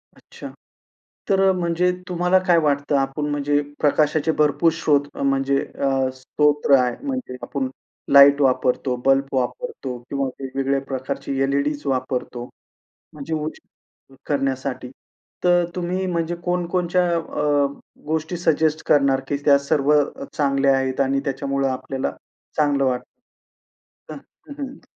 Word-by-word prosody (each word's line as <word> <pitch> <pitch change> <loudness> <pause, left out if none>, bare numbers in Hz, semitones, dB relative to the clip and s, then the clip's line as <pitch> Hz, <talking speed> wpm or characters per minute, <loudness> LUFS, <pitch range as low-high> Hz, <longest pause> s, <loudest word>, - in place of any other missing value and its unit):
अच्छा. - - -11 0.8
तर 195 -1 +3
अ, - - +5
म्हणजे 180 0 +1 0.2
तुम्हाला 180 +1 +2
काय 175 - +5
वाटतं? 145 -1 0
आपण 135 +2 -1
म्हणजे 145 0 +1 0.2
प्रकाशाचे 155 +1 +2
भरपूर 150 +3 +3
स्रोत 145 -3 +1
म्हणजे 135 0 +1 0.2
अ, 135 -1 +1
स्तोत्र 145 +2 +2
आहे, 125 -1 0
म्हणजे 260 - -4
आपण 135 -2 -3 0.4
लाईट 140 +1 +8
वापरतो, 130 -1 +1
बल्ब 135 0 +4
वापरतो 130 - -3
किंवा 140 -1 -1
वेगवेगळ्या 135 0 -1
प्रकारची 135 +1 -4
एल-ई-डीज 140 +2 0
वापरतो, 125 -2 -2 0.7
म्हणजे 150 +2 -5
उजेड 150 -3 -9
करण्यासाठी. 135 -2 -2 0.5
तर 175 0 +4
अ, - - -3
तुम्ही 180 +1 -2
म्हणजे 170 -1 -1
कोणकोणच्या 180 0 0
अ, 150 -3 0 0.4
गोष्टी 160 +3 -2
सजेस्ट 160 -1 +1
करणार 140 -2 +4
की 145 - 0
त्या 140 -1 +6
सर्व 150 -1 +2 0.4
चांगल्या 140 -2 +2
आहेत 130 -1 -1
आणि 135 0 +2
त्याच्यामुळं 140 0 -1
आपल्याला 130 +1 -3 0.5
चांगलं 145 -3 +2
वाटतं? 125 -1 0 1.1
हां, - - -7 0.3
हं, - - -6
हं. 275 0 -7
145 Hz, 125 wpm, -22 LUFS, 135-160 Hz, 1.1 s, लाईट